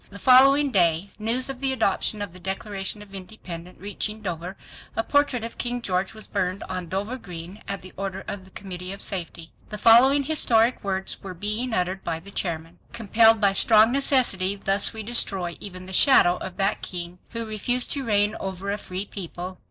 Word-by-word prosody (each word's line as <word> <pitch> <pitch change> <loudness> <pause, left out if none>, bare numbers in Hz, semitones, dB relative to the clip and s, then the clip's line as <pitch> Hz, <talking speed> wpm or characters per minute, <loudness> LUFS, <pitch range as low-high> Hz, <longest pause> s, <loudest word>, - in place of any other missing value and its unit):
The 200 - -10
following 270 +4 +6
day 175 -1 +2
news 230 +4 +1
of 270 -2 -5
the 270 0 +1
adoption 215 -3 +1
of 190 -4 -7
the 185 - -12
Declaration 195 +2 -3
of 200 -1 -18
Independence 180 -3 -9
reaching 205 +2 -3
Dover 180 0 -5 0.4
a 225 - 0
portrait 285 -4 +1
of 230 - -6
King 245 0 -1
George 190 -2 -2
was 215 - -5
burned 185 -1 -2
on 185 -2 -5
Dover 205 +8 -3
Green 180 +1 -9
at 200 -2 -4
the 185 - -12
order 195 0 -5
of 200 -2 -5
the 190 - -17
Committee 185 -1 -7
of 200 - -8
Safety. 170 -3 -4 0.2
The 210 - -5
following 255 +6 +6
historic 250 -5 +2
words 190 -1 -2 0.2
being 215 +5 -1
uttered 185 -1 -1
by 165 -1 -3
the 195 +4 -12
chairman: 165 -2 -4
"Compelled 225 0 +4
by 200 -2 +3
strong 220 +2 +5
necessity 250 -8 +2
thus 195 0 0
we 220 -1 -7
destroy 195 -6 0
even 185 -2 -8
the 190 - -9
shadow 180 -6 +6
of 185 -1 -8
that 195 +2 +1
king 175 0 -5
who 230 -1 -4
refused 235 +4 +1
to 280 - -1
reign 210 -2 +2
over 195 +1 -4
a 205 - -3
free 185 +1 -5
people." 185 -2 -7
200 Hz, 190 wpm, -24 LUFS, 185-225 Hz, 0.4 s, following